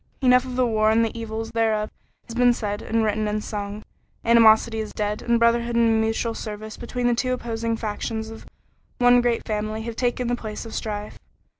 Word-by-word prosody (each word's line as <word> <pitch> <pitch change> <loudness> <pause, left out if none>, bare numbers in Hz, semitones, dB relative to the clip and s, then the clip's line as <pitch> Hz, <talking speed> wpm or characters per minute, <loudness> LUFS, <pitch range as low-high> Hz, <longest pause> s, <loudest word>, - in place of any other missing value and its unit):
Enough 250 0 +5
of 255 -1 -6
the 255 0 +3
war 215 -2 +2
and 225 +1 +4
the 225 - -5
evils 225 -1 -5
thereof 220 -2 0 0.4
has 230 - -8
been 245 0 +4
said 205 -2 -3
and 225 0 0
written 215 0 0
and 210 0 -2
sung. 205 0 -5 0.4
Animosity 225 -1 +5
is 215 -1 -4
dead, 210 0 -2
and 235 -1 +2
brotherhood 235 0 +2
and 225 -1 +3
mutual 225 +1 -1
service 215 -1 -7
between 245 +1 -4
the 240 - +4
two 255 +2 0
opposing 230 -2 -2
factions 220 +1 -4
of 225 - -11 0.5
one 245 0 +5
great 240 -1 0
family 215 +1 -3
have 230 0 -5
taken 245 0 -1
the 245 - +1
place 215 -2 -7
of 225 - -9
strife. 210 -1 -5
225 Hz, 195 wpm, -24 LUFS, 215-235 Hz, 0.5 s, Enough